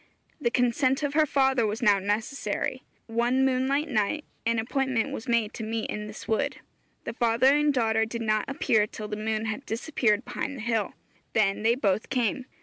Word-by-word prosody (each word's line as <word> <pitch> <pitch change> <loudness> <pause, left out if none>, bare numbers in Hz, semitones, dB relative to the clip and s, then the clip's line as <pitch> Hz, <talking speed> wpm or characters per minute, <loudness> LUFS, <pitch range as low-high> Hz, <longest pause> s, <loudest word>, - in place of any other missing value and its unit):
The 235 - +2
consent 255 +3 +1
of 285 -1 -1
her 310 0 +4
father 265 -4 +2
was 215 +3 -3
now 205 -3 +5
necessary. 210 +7 -2 0.2
One 240 +3 +1
moonlight 265 +3 +1
night 260 +4 0 0.2
an 230 0 +2
appointment 255 +1 0
was 225 - -6
made 230 -3 +1
to 225 - -6
meet 225 0 -3
in 210 0 -4
this 215 - -9
wood. 280 +6 0 0.5
The - - -5
father 240 +3 +3
and 295 0 +3
daughter 225 -4 +2
did 230 +1 -5
not 215 -1 +1
appear 220 -6 +2
till 215 0 -7
the 210 - -3
moon 215 +1 -2
had 220 +5 -3
disappeared 225 -2 0
behind 275 - -4
the - - -7
hill. 225 -3 0 0.4
Then 200 -3 +2
they 230 +2 +3
both 210 -4 0
came. 250 0 0
230 Hz, 185 wpm, -27 LUFS, 215-265 Hz, 0.5 s, now